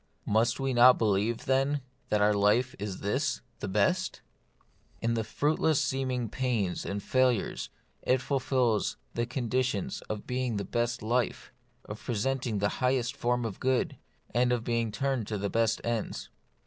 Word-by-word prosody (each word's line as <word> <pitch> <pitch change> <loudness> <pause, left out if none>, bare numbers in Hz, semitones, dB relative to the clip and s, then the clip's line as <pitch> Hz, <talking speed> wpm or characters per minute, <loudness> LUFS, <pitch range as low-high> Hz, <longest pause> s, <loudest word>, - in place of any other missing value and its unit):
Must 115 +4 +2
we 135 -1 0
not 125 +1 +7
believe, 110 +1 +1
then, 135 +2 +2 0.3
that 105 -1 +3
our 105 0 +4
life 105 +6 +3
is 100 -2 -4
this: 130 +6 0 0.2
the - - -4
best? 105 - +1 0.8
In 115 0 0
its 110 -1 -2
fruitless 155 0 +2
seeming 130 -4 -1
pains 110 -7 -1
and 100 0 -3
failures, 130 -4 +1 0.3
it 130 - +2
fulfils 130 -4 +1 0.2
the 120 0 -1
conditions 125 -3 -1
of 110 -1 -4
being 125 -3 -1
the 100 - -2
best 120 -1 -1
life, 120 +2 -1 0.3
of 105 +1 -8
presenting 120 -1 -1
the 100 +1 +1
highest 125 0 +1
form 120 -2 0
of 105 -4 -5
good, 130 -1 +1 0.4
and 125 +1 +3
of 120 -2 0
being 115 -2 0
turned 130 0 -1
to 105 - -2
the 100 0 -2
best 115 -1 +2
ends. 115 -2 -3
120 Hz, 155 wpm, -29 LUFS, 105-130 Hz, 0.8 s, not